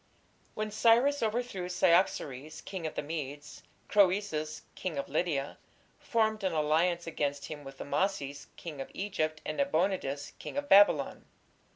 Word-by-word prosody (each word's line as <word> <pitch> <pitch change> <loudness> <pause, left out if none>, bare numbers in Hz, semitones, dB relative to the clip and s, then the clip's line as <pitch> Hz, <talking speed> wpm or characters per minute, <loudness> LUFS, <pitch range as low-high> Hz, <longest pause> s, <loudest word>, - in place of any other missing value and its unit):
When 215 0 -3
Cyrus 240 +6 +4
overthrew 220 -5 -2
Cyaxares, 165 -5 +1
king 185 -4 -5
of - - -7
the - - -2
Medes, 145 -1 -6 0.3
Croesus, 185 -6 +2
king 175 -6 -4
of 140 - -2
Lydia, 145 -2 -1 0.4
formed 220 -2 0
an 185 -3 0
alliance 165 +3 +2
against 145 -3 -2
him 150 -2 -7
with 135 -1 -11
Amasis, 145 -5 -2
king 150 -5 -7
of - - -7
Egypt, 155 -6 -2
and - - -3
Nabonidus, 180 - 0
king - - -7
of 285 0 -2
Babylon. 205 -2 +5
170 Hz, 140 wpm, -31 LUFS, 150-205 Hz, 0.4 s, Babylon